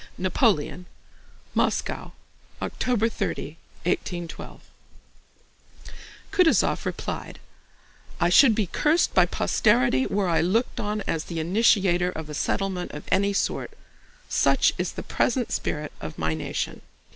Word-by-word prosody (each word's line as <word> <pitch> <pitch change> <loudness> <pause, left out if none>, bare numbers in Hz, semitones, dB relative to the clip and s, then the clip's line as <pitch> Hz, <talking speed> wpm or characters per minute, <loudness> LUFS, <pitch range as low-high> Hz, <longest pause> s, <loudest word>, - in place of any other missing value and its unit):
NAPOLEON 180 - +1 0.7
MOSCOW, - - -1 0.5
OCTOBER 230 -3 0
30, 220 -3 -3 0.4
1812 175 -1 -3 1.7
Kutúzov 360 -3 +3
replied: - - -5 0.8
"I 175 - +3
should 225 +5 +6
be 215 -2 +1
cursed 305 - +1
by - - +5
posterity 210 - +2
were 200 -1 0
I 170 - +2
looked 210 +9 0
on 210 0 -2
as 165 -4 -2
the 165 -2 -4
initiator 180 0 +3
of 160 -4 -7
a - - -6
settlement 185 +3 -2
of 150 - -7
any 200 +1 +3
sort. - - -2 0.5
Such - - +3
is - - -2
the - - -6
present 245 -1 0
spirit 150 -1 -2
of 80 - -7
my 80 0 0
nation." 80 +1 -4
185 Hz, 120 wpm, -25 LUFS, 165-220 Hz, 1.7 s, should